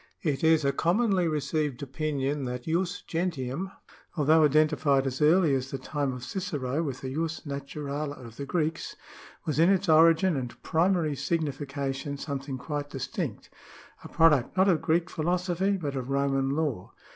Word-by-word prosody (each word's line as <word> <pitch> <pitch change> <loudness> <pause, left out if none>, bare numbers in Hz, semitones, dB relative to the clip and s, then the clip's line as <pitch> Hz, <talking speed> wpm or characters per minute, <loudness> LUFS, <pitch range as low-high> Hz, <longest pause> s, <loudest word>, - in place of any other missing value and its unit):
It 150 -3 -1
is 160 -2 +4
a 140 - +3
commonly 185 +2 +2
received 150 -3 -1
opinion, 140 0 -2
that 125 0 -4
jus 175 +4 -1
gentium, 165 0 -3 0.5
although 155 +2 +5
iden 155 +1 +5
tified 140 -3 +1
as 130 +1 -3
early 160 0 +5
as 130 0 -1
the 135 - -4
time 140 +1 -2
of 125 -1 -7
Cicero 145 -3 -2
with 140 -5 -4
the 130 0 -5
jus 165 +2 -2
naturale 140 0 -4
of 115 -2 -12
the 140 - -5
Greeks, 165 0 -2 0.5
was 155 -1 -1
in 165 +3 +6
its 195 0 +2
origin 165 +2 +5
and 125 -3 -5
primary 165 -2 +1
signification 140 -2 -3
something 140 -1 -4
quite 145 +2 -4
distinct 135 -1 -5 0.3
— - - -22
a - - -7
product 160 -1 +3
not 190 +1 +5
of 175 -5 +3
Greek 165 +2 +1
philosophy 180 +4 0
but 145 -6 -4
of 130 -1 -4
Roman 135 -1 +1
law. 140 - -2
150 Hz, 165 wpm, -28 LUFS, 135-165 Hz, 0.5 s, in